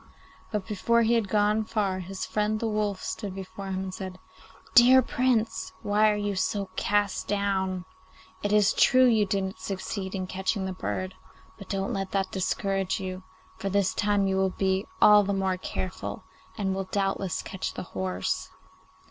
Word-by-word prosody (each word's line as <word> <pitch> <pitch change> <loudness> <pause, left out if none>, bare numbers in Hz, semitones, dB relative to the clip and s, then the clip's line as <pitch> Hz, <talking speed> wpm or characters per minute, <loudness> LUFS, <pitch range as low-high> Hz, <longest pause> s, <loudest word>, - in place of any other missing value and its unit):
But 210 -3 -2
before 235 +2 +2
he 230 +1 +3
had 230 -3 +2
gone 210 +1 +2
far 205 -4 -1
his 185 +1 -5
friend 215 0 0
the 230 - -1
wolf 210 -3 -1
stood 200 -4 -4
before 195 +1 -7
him 190 0 -2
and 190 -1 -5
said, 185 -1 -6 0.6
'Dear 255 0 +8
Prince, 250 -4 0
why 210 +1 +4
are 210 - +2
you 205 -1 -2
so 195 0 -1
cast 205 -1 0
down? 190 -3 0 0.6
It 205 - -1
is 210 0 +4
true 255 0 +5
you 220 -4 +4
didn't 190 0 -2
succeed 190 0 -4
in 185 -1 -2
catching 190 +2 -2
the 190 - -3
bird; 185 0 -3 0.5
but 200 - -11
don't 195 0 -1
let 195 -1 -3
that 195 -1 0
discourage 195 +1 -1
you, 185 -1 -5 0.4
for 195 - -2
this 200 -1 +1
time 205 -1 +2
you 190 0 +1
will 190 0 +2
be 190 +1 0
all 210 0 +8
the 200 0 -1
more 190 -1 0
careful, 185 0 -5 0.3
and 195 -3 0
will 190 0 -2
doubtless 195 -2 -1
catch 190 -1 -5
the - - -4
horse. 95 -1 -2
195 Hz, 175 wpm, -27 LUFS, 190-210 Hz, 0.6 s, Dear